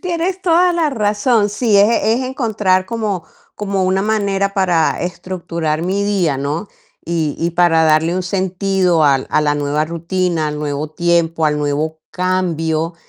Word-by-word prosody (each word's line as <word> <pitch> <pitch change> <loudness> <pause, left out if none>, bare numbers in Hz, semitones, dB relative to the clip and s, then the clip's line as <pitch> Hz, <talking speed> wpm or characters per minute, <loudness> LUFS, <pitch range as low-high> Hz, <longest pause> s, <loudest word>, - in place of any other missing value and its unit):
tienes 360 +1 -2
toda 355 +1 +3
la 330 -3 +1
razón, 210 -1 +1
sí, 210 +1 +1
es 205 - +6 0.2
es 225 +3 +2
encontrar 210 -8 0
como 215 -6 -3 0.3
como 200 -2 -2
una 190 +1 +1
manera 200 -2 0
para 175 -5 +1
estructurar 170 -3 -3
mi 190 +3 -1
día, 190 -8 0
¿no?, 145 +9 -3 0.4
y 160 -3 -2
y 170 +1 0
para 170 -1 +3
darle 160 +2 +2
un 185 - -1
sentido 185 -2 +1
al 135 -2 +2
a - - +3
la 150 -1 +1
nueva 145 +1 0
rutina, 170 0 -1
al 150 0 -5
nuevo 150 0 -3
tiempo, 170 -1 +1
al 150 -1 0
nuevo 150 +2 -2
cambio, 170 -3 -1
180 Hz, 155 wpm, -17 LUFS, 160-205 Hz, 0.4 s, es